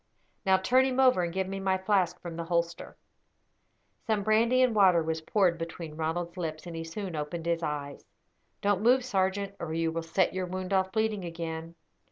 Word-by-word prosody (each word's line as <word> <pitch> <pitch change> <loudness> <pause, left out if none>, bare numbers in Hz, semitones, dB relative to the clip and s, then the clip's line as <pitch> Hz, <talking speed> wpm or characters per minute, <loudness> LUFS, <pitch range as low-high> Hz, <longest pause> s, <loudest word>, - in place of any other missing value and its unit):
Now 190 0 +6
turn 250 +8 +3
him 260 0 -1
over, 255 -7 +5
and 170 -1 -1
give 190 +1 -1
me 195 0 -4
my 190 -1 +1
flask 190 -2 +1
from 170 -2 -7
the 170 0 -4
holster." 170 0 -2 1.1
Some 215 -3 +1
brandy 230 +5 +4
and 250 -2 +3
water 185 -5 +5
was 160 0 -2
poured 175 -1 +2
between 165 -1 -6
Ronald's 170 +2 -3
lips, 160 -2 -4
and 170 -1 -7
he 165 - -4
soon 180 +1 -5
opened 155 +2 -4
his 170 0 0
eyes. 145 -3 -4 0.6
"Don't 200 -1 +1
move, 250 +3 +4
sergeant, 195 -3 0
or 160 -1 -4
you 165 0 0
will 165 0 -2
set 165 +3 +1
your 185 -1 -2
wound 185 +1 -4
off 190 0 +2
bleeding 220 -2 0
again. 165 -1 -5
180 Hz, 195 wpm, -29 LUFS, 165-200 Hz, 1.1 s, Now